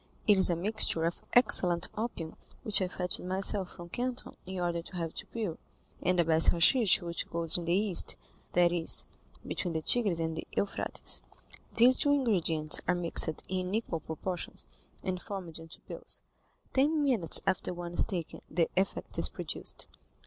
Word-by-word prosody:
It 210 - +5
is 190 - +5
a 175 - +1
mixture 185 -2 +1
of 170 +1 -3
excellent 180 -8 +5
opium, 210 -8 -5 0.3
which 210 -2 +5
I 185 - 0
fetched 180 0 -3
myself 190 +1 0
from 170 0 -11
Canton 250 +5 -4
in 190 0 -6
order 175 -1 -2
to 180 - -12
have 165 -2 -4
it - - -6
pure, 210 -8 -5 0.4
and 180 0 0
the 170 - +3
best 160 0 +4
hashish 200 +5 +4
which 170 0 -3
grows 165 -1 +4
in 175 - -1
the 170 - 0
East—that 180 -3 0
is, 170 -2 +2 0.4
between 175 -3 -4
the 160 - -3
Tigris 205 -7 +4
and 160 0 -3
the 160 - -7
Euphrates. 200 - +1 0.5
These 250 +3 +5
two 285 - +1
ingredients 170 - +2
are 180 - +2
mixed 170 -2 +3
in 185 +1 -3
equal 220 -7 -3
proportions, 170 +3 -5 0.4
and 185 -2 -4
formed 180 -5 -8
into 165 0 -12
pills. - - -4 0.5
Ten 295 +3 +1
minutes 230 - +2
after 190 -2 -1
one 175 -1 -7
is - - +4
taken, 175 -5 -6
the 165 0 0
effect 190 +1 -1
is - - +2
produced. - - -4
180 Hz, 170 wpm, -29 LUFS, 170-205 Hz, 0.5 s, It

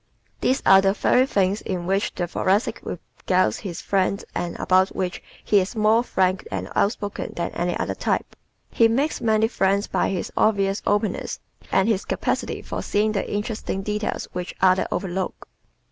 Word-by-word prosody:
These 260 - +1
are 195 0 +8
the 195 0 +3
very 250 +5 +3
things 200 -3 +1
with 180 -2 -2
which 195 +2 0
the 175 - -1
Thoracic 190 +5 0
regales 185 0 -1
his 185 -5 -6
friends 195 0 0
and 175 -1 -3
about 185 +1 +3
which 180 -1 -2 0.2
he 205 - +4
is 190 +5 -3
more 220 +1 +4
frank 185 -5 0
and 95 -1 -4
outspoken 205 -1 -1
than 170 - -2
any 175 +1 -1
other - - -2
type. - - -2 0.4
He 230 - +5
makes 270 +7 0
many 220 -1 +3
friends 200 -2 +1
by - - 0
his 185 -3 -3
obvious 200 -2 +2
openness 205 -1 0 0.3
and 195 +1 +3
his 215 -4 +1
capacity - - -2
for - - -4
seeing 210 +1 +1
the 200 -2 -2
interesting 205 -2 -3
details 210 +1 -2
which 180 0 -5
others 185 0 +4
overlook. 190 -1 -3
195 Hz, 165 wpm, -23 LUFS, 185-215 Hz, 0.4 s, are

